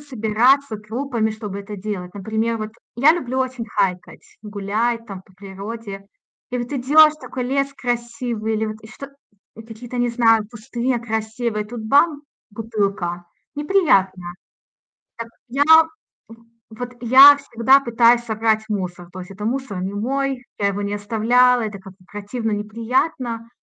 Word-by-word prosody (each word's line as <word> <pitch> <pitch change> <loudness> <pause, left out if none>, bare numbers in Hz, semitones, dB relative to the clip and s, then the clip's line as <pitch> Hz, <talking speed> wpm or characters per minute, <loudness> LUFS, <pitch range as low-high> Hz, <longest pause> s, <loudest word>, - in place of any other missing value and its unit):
собираться 250 0 +1
группами, 225 +1 -2
чтобы 210 -2 -6
это 205 +1 -8
делать. 185 -3 -5
Например, 220 +3 -2
вот 215 0 -5 0.3
я 280 +6 +6
люблю 260 -7 -3
очень 255 -3 -3
хайкать, 180 -5 -3
гулять 215 +3 -2
там 195 -4 -9
по 190 - -24
природе. 200 +1 -8 0.4
И 250 - -2
вот 240 +3 -5
идёшь: 300 +4 +5
такой 260 -4 -6
лес 275 +2 -1
красивый 235 -3 -3
или 220 0 -1
вот 215 0 -5
и 220 - -12
что 275 +5 -10 0.5
и 225 - -10
какие-то, 230 +2 -9
не 245 0 +1
знаю, 225 -2 +3
кусты, 240 +2 -3
а, - - 0
красивые, 220 -1 -3
и - - -16
тут 240 0 -7
бам- 285 +6 +3 0.3
бутылка. 200 -5 -3 0.3
Неприятно. 290 - +2 0.9
Так 230 0 -7 0.2
я, 275 +4 0 0.7
м, 230 0 -17 0.2
вот 245 +3 -7
я 265 +4 +8
всегда 270 -1 +3
пытаюсь 235 -1 +3
собрать 220 -1 0
мусор. 180 -4 -4
То 185 - -8
есть 180 - -10
это 195 +2 -8
мусор 235 -5 -3
не 190 +1 -3
мой, 265 +4 -2
я 200 - +1
его 200 +1 -3
не 200 0 -3
оставляла, 235 +4 +3
это 210 -2 -5
как 190 0 -13
бы 185 0 -25
противно, 215 +3 -4
неприятно. 230 +3 -2
225 Hz, 155 wpm, -21 LUFS, 210-250 Hz, 0.9 s, я